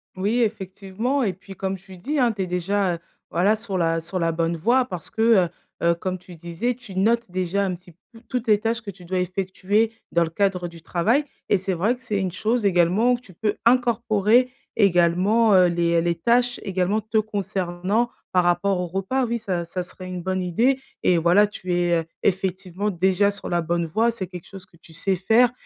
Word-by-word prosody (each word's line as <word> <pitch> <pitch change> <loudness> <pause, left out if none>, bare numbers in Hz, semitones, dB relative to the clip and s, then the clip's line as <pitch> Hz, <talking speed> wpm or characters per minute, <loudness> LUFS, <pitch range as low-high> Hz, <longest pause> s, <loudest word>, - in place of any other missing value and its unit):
Oui 205 +6 0
effectivement 210 +5 -2
et 195 -4 0
puis 195 +2 -13
comme 190 +1 -2
tu 190 0 -14
dis, 290 +11 -2
hein, 245 -2 +4
tu 205 -3 -3
es 185 - -4
déjà, 180 +1 0
heu, 165 - -10 0.3
voilà 200 +6 +3
sur 215 -4 -4
la 165 -1 +1
sur 170 +3 -5
la 165 -2 +1
bonne 165 +1 -1
voie 245 +10 +2
parce 180 -8 -7
que, 220 - -4 0.3
heu - - -16 0.3
heu, 170 - +4
comme 185 +2 -3
tu 180 -1 -13
disais 175 +9 -2
tu 235 -6 -12
notes 230 +3 +2
déjà 185 +2 0
un 185 -2 -2
petit 175 0 -16 0.2
peu 225 - -14
toutes 250 -1 -2
les 210 - +5
tâches 230 +1 -1
que 205 -3 -7
tu 180 -1 -16
dois 185 +1 -2
effectuer 190 +4 0 0.2
dans 170 0 +4
le 160 - -3
cadre 180 0 0
du 170 -1 -14
travail 215 - +1 0.2
et 205 - +4
c'est 190 0 -2
vrai 205 +8 +1
que 250 - -22
c'est 220 -5 -2
une 190 -2 -1
chose 220 +6 0
également 195 +6 +3
que 240 - -19
tu 190 -7 -16
peux 210 +4 -2
incorporer 235 -1 +3 0.3
également, 195 +3 +4
heu, 185 -1 +6
les 170 -1 +2
les 170 0 0
tâches 245 +7 +1
également 195 +2 0
te 220 +1 -2
concernant 200 +1 -1 0.2
par 180 -1 +3
rapport 180 +2 +2
au 180 - -2
repas 195 +9 -1
oui, 235 0 -1
ça 185 -6 -3
ça 180 +2 -4
serait 185 +1 -10
une 180 -1 -5
bonne 185 0 -1
idée 235 +10 +1 0.2
et 180 - +4
voilà 175 +5 +5
tu 185 -3 -5
es, 175 0 +1
heu, - - -21 0.2
effectivement 190 +1 -1
déjà 190 +2 +2
sur 200 - -6
la 175 -1 +1
bonne 170 +1 -1
voie, 225 +8 +2
c'est 195 -5 -5
quelque 180 -1 -10
chose 195 -1 -11
que 175 - -24
tu 165 0 -17
sais 185 +4 0
faire 230 +6 +4
190 Hz, 220 wpm, -23 LUFS, 175-220 Hz, 0.3 s, heu